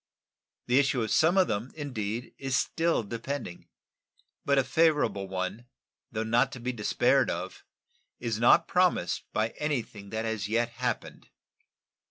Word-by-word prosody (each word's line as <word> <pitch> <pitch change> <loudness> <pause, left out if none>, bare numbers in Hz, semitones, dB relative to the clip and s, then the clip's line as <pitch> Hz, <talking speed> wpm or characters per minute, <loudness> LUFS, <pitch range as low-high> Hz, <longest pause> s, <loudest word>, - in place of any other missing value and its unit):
The 125 +2 +4
issue 135 -4 +2
of 110 - -3
some 165 +4 +4
of 185 - +5
them, 110 +5 -3
indeed, 120 -6 -4
is 135 -1 -1
still 165 -2 +1
depending, 115 -2 -5 0.8
but 140 0 +2
a 135 - +4
favorable 145 -12 +2
one, 95 +5 -4 0.4
though 110 - -2
not 120 +4 +2
to 130 - -7
be 125 +2 -3
despaired 105 -3 +2
of, - - -5 0.6
is 115 -3 -2
not 120 - +5
promised 180 - +1
by 110 +1 0
anything 120 -9 -3
that 110 +1 -3
has 110 -3 -2
yet 115 +2 +1
happened. 120 0 -4
120 Hz, 145 wpm, -28 LUFS, 110-140 Hz, 0.8 s, of